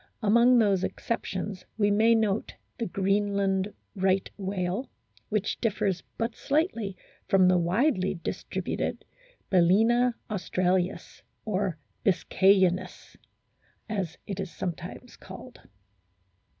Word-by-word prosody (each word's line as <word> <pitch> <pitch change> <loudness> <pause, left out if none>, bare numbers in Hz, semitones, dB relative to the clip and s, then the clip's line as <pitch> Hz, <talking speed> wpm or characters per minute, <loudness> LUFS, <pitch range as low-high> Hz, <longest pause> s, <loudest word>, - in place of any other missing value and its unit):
Among 235 +4 +5
these 200 -5 +3
excep 230 - -2
tions 190 0 -4
we 205 -2 +3
may 225 +3 +5
note 215 -2 0 0.2
the 230 - -1
Greenland 195 0 0 0.2
Right 190 0 +1
whale, 190 +3 -3 0.4
which 210 -1 -1
differs 205 -5 0 0.2
but 230 0 -2
slightly 235 - -1 0.3
from 190 -2 +5
the 180 -1 +4
widely 190 - +1
distributed 170 - -4 0.5
Bal&na 225 +7 +4
australis, 185 -3 -1 0.2
or 195 -5 -1 0.3
biscayensis 190 -1 +2 0.7
as 190 -6 -3
it 195 -1 -5
is 190 -2 -3
sometimes 175 -1 -6
called. - - -11
195 Hz, 100 wpm, -27 LUFS, 185-220 Hz, 0.7 s, Among